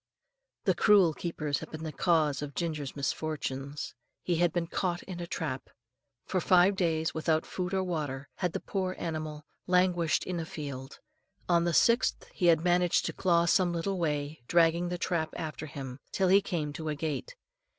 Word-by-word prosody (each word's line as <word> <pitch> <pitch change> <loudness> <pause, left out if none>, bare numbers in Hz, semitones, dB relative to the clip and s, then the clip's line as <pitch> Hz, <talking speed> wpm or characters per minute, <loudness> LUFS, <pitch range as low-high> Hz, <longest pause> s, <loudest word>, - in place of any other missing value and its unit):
The - - +3
cruel 195 -6 +5
keepers 150 -3 -2
had 160 - -8
been 155 0 -7
the 160 - -3
cause 155 -3 +2
of 145 -1 -6
Ginger's 155 -5 -3
misfortunes. 140 -1 -3 0.3
He 175 -2 0
had 175 0 +3
been 175 0 -1
caught 175 0 -2
in 180 -2 -7
a 170 - -5
trap. 140 -6 -4 0.6
For 185 - 0
five 185 +3 +5
days, 160 -4 0
without 160 0 +1
food 180 -1 -3
or 190 -1 +1
water, 145 -6 -3
had 180 -3 -1
the - - -1
poor 185 -2 -2
animal 155 -2 -4 0.2
languished 180 -2 +3
in 180 -2 -3
a 165 - -3
field. 140 -4 -7 0.5
On 170 -1 +3
the 170 - +1
sixth 235 +1 +3
he 180 - +1
had 165 -2 +5
managed 175 0 +3
to - - -2
crawl 170 -2 +3
some 175 0 +3
little 180 +3 -1
way, 150 -2 -2
dragging 170 +1 +3
the 180 - -2
trap 170 -3 -1
after 155 -2 -5
him, 135 -2 -7
till 190 -1 +2
he 195 +2 +6
came 160 -7 -3
to 155 +1 -4
a 150 - -1
gate. 160 - -4
165 Hz, 180 wpm, -30 LUFS, 150-180 Hz, 0.6 s, he